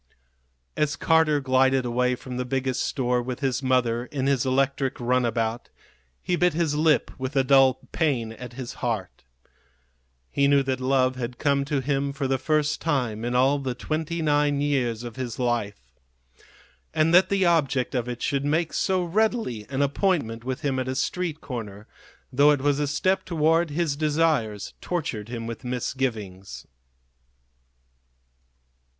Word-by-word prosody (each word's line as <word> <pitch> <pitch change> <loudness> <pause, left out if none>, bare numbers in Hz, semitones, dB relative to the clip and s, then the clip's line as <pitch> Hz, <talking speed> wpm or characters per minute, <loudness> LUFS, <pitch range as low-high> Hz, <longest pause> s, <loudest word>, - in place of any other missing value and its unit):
As 150 -1 0
Carter 160 -2 +3
glided 130 -1 +2
away 125 +1 +1
from 125 0 -8
the 125 - -1
Biggest 130 0 -1
Store 125 -2 0
with 125 +2 -5
his 130 -2 0
mother 125 -2 +1
in 135 -3 -3
his 135 -1 +1
electric 135 0 0
runabout, 120 -2 0 0.5
he 180 - 0
bit 175 -1 +2
his 165 -3 +1
lip 155 0 +2
with 130 +2 -4
a 135 - +4
dull 135 -1 +4
pain 130 -9 0
at 125 +1 -9
his 125 0 -6
heart. 110 -7 -3 1.1
He 140 - +2
knew 140 -1 +4
that 130 -1 -2
love 130 0 +1
had 125 0 -5
come 140 -1 +1
to 140 -1 -1
him 140 +1 -1
for 140 -1 -2
the 135 0 0
first 150 +2 0
time 125 -9 -1
in 120 +1 -2
all 135 +3 +3
the 130 -2 -3
twenty 160 +5 -3
nine 145 -1 +2
years 125 -6 0
of 120 0 -8
his 125 -3 -4
life. 105 - -2 1.0
And 160 +1 +3
that 180 +2 +6
the 195 -2 +2
object 140 -7 +1
of 125 -2 -1
it 120 0 -5
should 140 -2 0
make 160 +3 0
so 185 -2 +1
readily 195 - 0
an 135 +1 0
appointment 140 - 0
with 130 +4 -4
him 135 -3 -1
at 130 - -2
a 130 - -2
street 160 +3 -2
corner, 110 -6 -7 0.5
though 140 +3 +5
it 145 -2 +3
was 145 0 +1
a 145 - 0
step 185 +7 +1
toward 165 0 +2
his 150 -1 -1
desires, 150 -9 0
tortured 130 - -3
him 115 -2 -5
with 115 +2 -6
misgivings. 115 -6 -4
135 Hz, 160 wpm, -25 LUFS, 125-150 Hz, 1.1 s, that